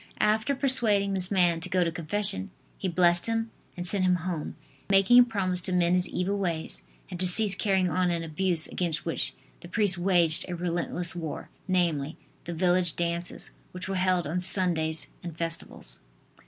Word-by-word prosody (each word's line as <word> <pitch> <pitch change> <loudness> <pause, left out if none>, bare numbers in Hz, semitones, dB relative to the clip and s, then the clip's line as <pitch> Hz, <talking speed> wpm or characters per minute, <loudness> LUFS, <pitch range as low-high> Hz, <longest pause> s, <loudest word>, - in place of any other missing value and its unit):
After 220 +6 +2
persuading 225 -8 +2
this 185 -1 -1
man 175 -4 +2
to - - -3
go 185 -1 +2
to 165 - -1
confession 160 - -1 0.3
he 190 - -2
blessed 175 +1 +3
him 225 0 -1 0.3
and 175 - -4
sent 190 +1 +2
him 180 -1 +3
home, 170 -5 -4 0.3
making 195 +5 +5
him 245 - +9
promise 190 -6 -2
to 185 - -2
mend 175 -1 +2
his 180 0 +1
evil 195 +3 -2
ways 170 -4 -2 0.3
and 180 - -6
to 185 - +2
cease 200 +2 +6
carrying 190 -3 +1
on 180 +1 +1
an 170 -1 -1
abuse 165 +1 0
against 160 -4 -3
which 165 - +2 0.3
the - - -11
priest 200 -3 +1
waged 175 -3 +3
a 180 - -3
relentless 175 0 -1
war, 165 -3 -6 0.2
namely, 165 -6 0 0.3
the 170 - -5
village 175 -1 +1
dances, 170 0 -3 0.2
which 180 +1 -6
were 195 - -3
held 185 -2 +1
on 165 +5 -2
Sundays 170 -4 0 0.2
and 170 -2 -8
festivals. 165 0 -4
180 Hz, 180 wpm, -27 LUFS, 170-190 Hz, 0.3 s, him